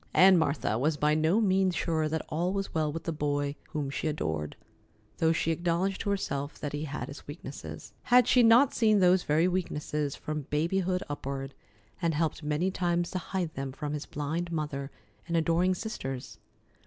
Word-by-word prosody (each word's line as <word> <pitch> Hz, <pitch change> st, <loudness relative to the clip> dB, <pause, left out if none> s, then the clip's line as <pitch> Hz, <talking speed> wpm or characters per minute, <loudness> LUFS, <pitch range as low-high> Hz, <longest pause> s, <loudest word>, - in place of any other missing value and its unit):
Aunt 190 Hz, +1 st, +8 dB
Martha 140 Hz, -8 st, 0 dB
was 150 Hz, +3 st, +1 dB
by 150 Hz, +1 st, +3 dB
no 160 Hz, +7 st, +3 dB
means 190 Hz, -3 st, +2 dB
sure 160 Hz, -2 st, 0 dB
that 160 Hz, 0 st, -2 dB
all 170 Hz, +4 st, 0 dB
was 195 Hz, 0 st, -3 dB
well 155 Hz, -2 st, +1 dB
with 165 Hz, +2 st, -5 dB
the 165 Hz, -, -2 dB
boy 145 Hz, -2 st, -1 dB
whom 145 Hz, -3 st, -3 dB
she 150 Hz, -, -2 dB
adored, 80 Hz, -, -2 dB, 0.6 s
though 160 Hz, 0 st, +4 dB
she 165 Hz, 0 st, +1 dB
acknowledged 175 Hz, +3 st, 0 dB
to 205 Hz, -, -2 dB
herself 145 Hz, -8 st, -2 dB
that 145 Hz, -, -5 dB
he 145 Hz, +1 st, -2 dB
had 150 Hz, 0 st, -5 dB
his 140 Hz, -, -10 dB
weaknesses. 145 Hz, -1 st, -8 dB
Had 245 Hz, -1 st, +6 dB
she 250 Hz, -, +5 dB
not 240 Hz, +4 st, +6 dB
seen 215 Hz, -3 st, +4 dB
those 185 Hz, -1 st, +5 dB
very 160 Hz, +3 st, +2 dB
weaknesses 150 Hz, -5 st, -2 dB
from 150 Hz, -2 st, -5 dB
babyhood 180 Hz, +4 st, 0 dB
upward, 135 Hz, -1 st, -5 dB, 0.5 s
and 165 Hz, -3 st, +1 dB
helped 160 Hz, +1 st, 0 dB
many 150 Hz, +5 st, 0 dB
times 175 Hz, -2 st, 0 dB
to 185 Hz, -, -2 dB
hide 180 Hz, -3 st, -3 dB
them 135 Hz, 0 st, -4 dB
from 145 Hz, +2 st, -4 dB
his 150 Hz, -1 st, -4 dB
blind 160 Hz, +4 st, -3 dB
mother 150 Hz, -4 st, -3 dB, 0.4 s
and 170 Hz, -1 st, 0 dB
adoring 170 Hz, +3 st, +2 dB
sisters? 135 Hz, -, -5 dB
160 Hz, 180 wpm, -29 LUFS, 145-180 Hz, 0.6 s, Aunt